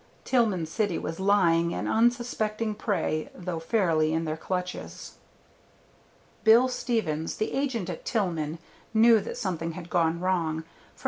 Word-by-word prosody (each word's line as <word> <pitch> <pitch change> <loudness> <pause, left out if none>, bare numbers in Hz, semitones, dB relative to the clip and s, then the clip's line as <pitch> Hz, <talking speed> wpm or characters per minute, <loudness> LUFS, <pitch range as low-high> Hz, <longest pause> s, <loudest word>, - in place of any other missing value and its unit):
Tillman 215 -10 +2
City 190 +2 -1
was 165 +2 -5
lying 170 -4 +3
an - - -3
unsuspecting 225 -2 +1
prey, 180 -7 -1
though 180 -2 -4
fairly 165 -4 +1
in 165 +1 0
their 155 0 -2
clutches. 180 +2 -5 1.3
Bill 230 +3 +6
Stevens, 220 -11 -1
the 215 - -2
agent 260 -9 -1
at 175 - -6
Tillman, 170 -8 -1 0.4
knew 225 0 +7
that 205 - -6
something 170 -7 -3
had 175 0 -9
gone 170 -1 +2
wrong, 170 -4 0
for 165 - -28
No. - - -27
185 Hz, 140 wpm, -27 LUFS, 165-220 Hz, 1.3 s, knew